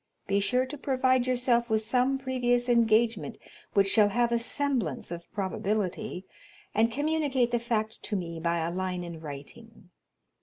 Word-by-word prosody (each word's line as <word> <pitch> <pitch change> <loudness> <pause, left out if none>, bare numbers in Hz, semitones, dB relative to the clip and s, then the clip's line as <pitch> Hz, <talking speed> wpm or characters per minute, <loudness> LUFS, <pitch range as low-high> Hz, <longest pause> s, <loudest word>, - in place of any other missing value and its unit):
Be 200 +1 +1
sure 250 +5 +1
to 280 +2 -8
provide 260 -2 +2
yourself 245 -1 +2
with 220 0 +2
some 250 +4 +2
previous 245 -2 0
engagement 230 -1 +2 0.4
which 200 -2 +4
shall 205 +1 +5
have 235 +3 +1
a 235 - +2
semblance 235 - -1
of 170 0 -8
probability, 195 -1 -2 0.5
and 225 +2 +3
communicate 285 -3 0
the 240 - +1
fact 220 -2 -2
to 210 - -4
me 170 -3 -4
by 170 +1 0
a 170 - -2
line 180 0 -3
in 170 -2 -7
writing. 170 +8 -11
230 Hz, 155 wpm, -28 LUFS, 190-250 Hz, 0.5 s, shall